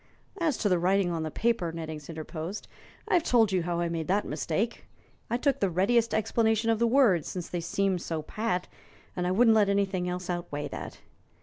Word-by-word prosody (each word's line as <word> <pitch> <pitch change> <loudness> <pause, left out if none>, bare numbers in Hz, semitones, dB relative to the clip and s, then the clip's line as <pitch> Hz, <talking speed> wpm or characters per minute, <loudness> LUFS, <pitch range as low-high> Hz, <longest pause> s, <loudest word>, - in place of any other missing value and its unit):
"As 315 -6 +1
to 210 - 0
the 180 -3 +2
writing 185 +1 +2
on 165 -1 -2
the 160 - -2
paper," 225 -2 0
Nettings 160 -2 -7
interposed, 160 +4 -6 0.4
"I've 350 - +3
told 230 -9 +3
you 185 -2 +2
how 170 0 -2
I 170 - 0
made 165 -2 -3
that 200 +3 +1
mistake. 170 +9 -2 0.4
I 235 - +1
took 275 +1 +1
the 195 - +2
readiest 225 +7 +2
explanation 225 +1 +1
of 225 - 0
the 235 - +3
words, 225 - +4
since 180 -2 -5
they 175 - -3
seemed 190 +1 0
so 160 -3 -3
pat, 180 0 -2 0.5
and 180 -1 -1
I - - +1
wouldn't 225 +3 +5
let 210 -2 +4
anything 195 -3 0
else 180 0 -4
outweigh 175 -5 -3
that. - - -8
185 Hz, 200 wpm, -28 LUFS, 170-225 Hz, 0.5 s, wouldn't